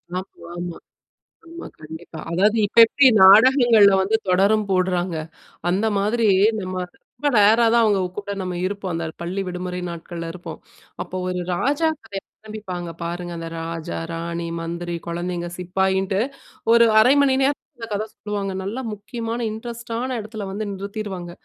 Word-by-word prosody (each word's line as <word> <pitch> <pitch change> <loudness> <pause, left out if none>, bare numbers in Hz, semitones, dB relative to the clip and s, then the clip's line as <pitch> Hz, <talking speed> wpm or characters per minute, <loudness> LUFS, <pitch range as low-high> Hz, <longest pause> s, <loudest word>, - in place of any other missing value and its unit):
ஆமா, 185 - -1 0.3
ஆமா. 175 -1 -5 0.7
ஆமா, 335 +1 -9
கண்டிப்பா. 160 +1 -10
அதாவது 205 +6 +3
இப்ப 220 - -20
எப்பிடி 270 +4 +4 0.2
நாடகங்கள்ல 220 0 +7
வந்து 210 +4 +1
தொடரும் 200 +3 +3
போட்றாங்க. 180 -2 0 0.5
அந்த 200 +5 +1
மாதிரி 220 +3 +1 0.3
நம்ம 185 0 -5 0.4
ரொம்ப 290 0 0
ரேர்ரா 220 +3 +6
தான் 235 - +5
அவுங்க 205 -3 +3 0.2
கூட 200 0 -4
நம்ம 185 -1 -3
இருப்போம். 195 -3 -4
அந்த 165 0 -2 0.2
பள்ளி 185 +3 -3
விடுமுறை 180 0 -4
நாட்கள்ல 170 0 -6
இருப்போம். 175 -1 -8 0.4
அப்போ 185 - -5
ஒரு 180 0 -2
ராஜா 285 - +1 0.2
கதைய 200 -3 -6 0.2
ஆரம்பிப்பாங்க 185 -5 -6
பாருங்க! 175 +1 -4
அந்த 165 - -6
ராஜா 165 -1 -5
ராணி, 170 0 -4
மந்திரி, 170 +1 -4
குழந்தைகள், 175 0 -4
சிப்பாயின்ட்டு 190 +1 0 0.5
ஒரு 235 0 +7
1/2 250 +5 +6
மணி 270 -2 +3
நேரம் 280 +2 +1 0.2
இந்த 230 -1 -7
கதை 210 +2 -1
சொல்லுவாங்க, 205 -2 -4
நல்லா 220 +7 -4
முக்கியமான 230 +3 -5
இன்ட்ரெஸ்ட் 235 +2 -8
ஆன 255 0 -2
இடத்துல 215 -1 -7
வந்து 210 +2 -4
நிறுத்திடுவாங்க 195 -3 -6
195 Hz, 145 wpm, -22 LUFS, 175-220 Hz, 0.7 s, நாடகங்கள்ல